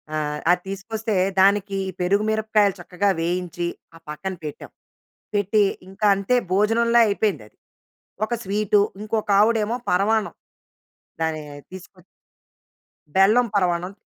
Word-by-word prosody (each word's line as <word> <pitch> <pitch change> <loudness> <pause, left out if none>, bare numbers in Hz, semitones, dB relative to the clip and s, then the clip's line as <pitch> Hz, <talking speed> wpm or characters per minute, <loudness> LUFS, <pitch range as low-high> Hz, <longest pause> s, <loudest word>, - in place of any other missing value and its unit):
ఆహ్, 150 -1 -2
అది 180 0 +2
తీసుకొస్తే, 215 +2 -4 0.3
దానికి 200 0 +3 0.2
పెరుగు 200 +4 +2
మిరపకాయలు 215 -2 +2
చక్కగా 180 +3 -1
వేయించి, 175 0 -2 0.3
ఆ - - -12
పక్కన 190 +6 -5
పెట్టాం. 150 - -8 0.6
పెట్టి 205 +1 +2 0.3
ఇంకా 195 +2 -1
అంతే 200 +5 0 0.2
భోజనంలా 230 +4 +3
అయిపోయింది 205 - 0
అది. - - -42 0.7
ఒక 220 - -4
స్వీటు, 205 +1 +2 0.2
ఇంకొకావిడెమో 215 +1 +1
పరమాన్నం. 210 +4 +1 0.9
దాన్ని 160 -1 -1 0.3
తీసుకొచ్చి 185 -1 -12 1.1
బెల్లం 215 +6 +5
పరవాన్నం. 180 -1 0
200 Hz, 105 wpm, -22 LUFS, 180-215 Hz, 1.1 s, బెల్లం